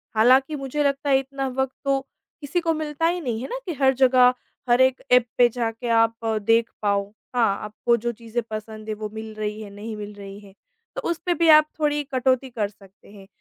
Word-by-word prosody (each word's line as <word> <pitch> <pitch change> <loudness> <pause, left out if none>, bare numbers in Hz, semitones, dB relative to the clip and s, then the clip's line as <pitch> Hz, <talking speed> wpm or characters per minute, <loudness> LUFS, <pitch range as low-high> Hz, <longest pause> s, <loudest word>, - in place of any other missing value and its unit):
हालाँकि 260 +6 +4
मुझे 275 +1 -2
लगता 280 0 0
है 270 -1 +5
इतना 270 0 -4
वक़्त 265 0 -1
तो 275 0 +2 0.4
किसी 290 +4 -1
को 330 -1 +1
मिलता 310 0 -1
ही 350 +1 -1
नहीं 235 -6 -3
है 260 - -5
ना - - -4
कि 355 - -3
हर 265 0 +5
जगह, 255 -1 +5 0.4
हर 240 +1 +5
एक 260 0 +3
ऐप 250 -1 +6
पे 245 - +7
जाके 230 0 -3
आप 225 0 +3 0.3
देख 230 0 +4
पाओ। 200 -1 0 0.3
हाँ, 225 -5 +2
आपको 225 +3 0
जो 235 +1 -2
चीज़ें 230 +1 -4
पसंद 215 0 -7
है 215 - -2
वो 215 0 -6
मिल 220 0 -7
रही 215 0 -4
है, 210 - -8
नहीं 215 +2 -7
मिल 210 0 -7
रही 200 0 -10
है। 200 -2 -16 0.4
तो - - -3
उस 340 - 0
पे 355 - +2
भी 335 -1 +2
आप 305 0 +8
थोड़ी 295 -1 +1
कटौती 260 0 +1
कर 220 -4 -2
सकते 200 -1 -20
हैं, 195 -2 -14
245 Hz, 220 wpm, -23 LUFS, 215-275 Hz, 0.4 s, आप